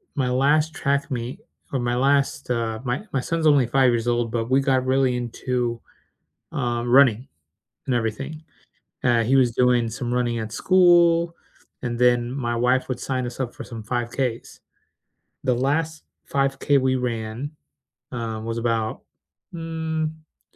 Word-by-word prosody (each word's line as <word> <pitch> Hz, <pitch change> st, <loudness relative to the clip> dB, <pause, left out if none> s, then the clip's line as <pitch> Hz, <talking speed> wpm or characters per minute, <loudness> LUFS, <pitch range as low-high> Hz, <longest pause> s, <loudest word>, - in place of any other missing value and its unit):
my 130 Hz, -4 st, 0 dB
last 145 Hz, +5 st, +2 dB
track 140 Hz, +1 st, -1 dB
meet 125 Hz, -, -4 dB, 0.3 s
or 135 Hz, -, +1 dB
my 120 Hz, 0 st, 0 dB
last, 140 Hz, +1 st, +1 dB
uh 115 Hz, -2 st, -1 dB
My 125 Hz, +6 st, -2 dB
my 135 Hz, -, +1 dB
son's 165 Hz, +2 st, 0 dB
only 140 Hz, -5 st, +5 dB
5 130 Hz, +1 st, +4 dB
years 120 Hz, 0 st, -1 dB
old, 120 Hz, -1 st, 0 dB
but 115 Hz, 0 st, -2 dB
we 135 Hz, +1 st, +4 dB
got 130 Hz, -1 st, +1 dB
really 130 Hz, -1 st, +2 dB
into, 120 Hz, 0 st, -2 dB, 0.7 s
um, 120 Hz, -2 st, -2 dB
running 125 Hz, -2 st, +5 dB, 0.6 s
and 130 Hz, -, +1 dB
everything. 135 Hz, +7 st, -3 dB, 0.6 s
Uh, 120 Hz, -2 st, +4 dB
he 130 Hz, +4 st, +2 dB
was 125 Hz, -3 st, +4 dB
doing 125 Hz, -1 st, +3 dB
some 120 Hz, +1 st, -4 dB
running 120 Hz, -1 st, 0 dB
at 110 Hz, 0 st, -6 dB
school, 170 Hz, +1 st, +4 dB, 0.5 s
and 120 Hz, -2 st, -3 dB
then 120 Hz, -1 st, +3 dB
my 120 Hz, -3 st, -2 dB
wife 125 Hz, +2 st, +1 dB
would 130 Hz, -, -3 dB
sign 130 Hz, -2 st, -2 dB
us 120 Hz, +2 st, -8 dB
up 125 Hz, -2 st, -3 dB
for -, -, -8 dB
some 115 Hz, -3 st, -8 dB
5Ks. 120 Hz, +1 st, -3 dB, 0.8 s
The 125 Hz, -, +2 dB
last 155 Hz, +5 st, -1 dB, 0.2 s
5K 135 Hz, +1 st, +1 dB
we 130 Hz, 0 st, +1 dB
ran, 120 Hz, +2 st, -3 dB, 0.6 s
um, 115 Hz, -2 st, -4 dB
was 115 Hz, 0 st, -3 dB
about, 115 Hz, -2 st, -1 dB, 0.5 s
mm, 160 Hz, -1 st, -3 dB
I 160 Hz, -1 st, -23 dB
125 Hz, 155 wpm, -23 LUFS, 120-140 Hz, 0.8 s, only